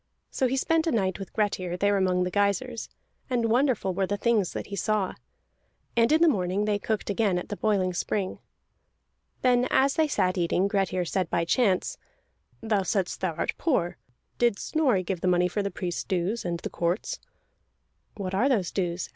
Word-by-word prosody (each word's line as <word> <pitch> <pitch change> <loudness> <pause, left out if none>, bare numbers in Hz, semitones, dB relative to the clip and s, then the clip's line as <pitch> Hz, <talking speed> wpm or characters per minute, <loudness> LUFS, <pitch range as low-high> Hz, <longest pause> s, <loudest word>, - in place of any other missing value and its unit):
So 260 - +1
he 265 +2 -1
spent 325 +4 +1
a - - +2
night 190 -5 0
with 195 - -7
Grettir, 185 -4 -1
there 205 +2 +2
among 185 -2 +2
the 180 - -2
geysirs, 210 +5 0 0.4
and 235 -3 +1
wonderful 245 -6 +2
were 190 +1 0
the 205 - -1
things 215 -4 +1
that - - -4
he 200 - -6
saw. 200 0 0 0.8
And 230 +2 +4
in 320 +2 +5
the - - +6
morning 195 - +1
they 210 -1 +1
cooked 210 0 -2
again 200 -3 +1
at 180 - -5
the 205 - -3
boiling 195 -4 +1
spring. 190 +2 -2 1.0
Then, 250 0 +4
as 270 +1 +3
they 315 -1 +2
sat 185 -10 +1
eating, 175 +3 +2
Grettir 190 -3 0
said 180 0 -1
by 170 - 0
chance: 195 0 +1 0.6
"Thou 220 -3 +1
saidst 185 0 -1
thou 180 -4 -1
art - - -1
poor. 255 - 0 0.4
Did 240 -4 +3
Snorri 255 -12 +1
give 185 -1 -3
the - - 0
money 180 0 +3
for 205 +4 -2
the 200 - -1
priest's 175 -2 -4
dues, 190 +5 -1
and 170 -1 -2
the - - -5
court's?" 175 +4 -1 1.0
"What 190 -2 -4
are 240 +8 +2
those 205 -10 +1
dues?" 180 -2 -2
200 Hz, 190 wpm, -27 LUFS, 180-230 Hz, 1.0 s, the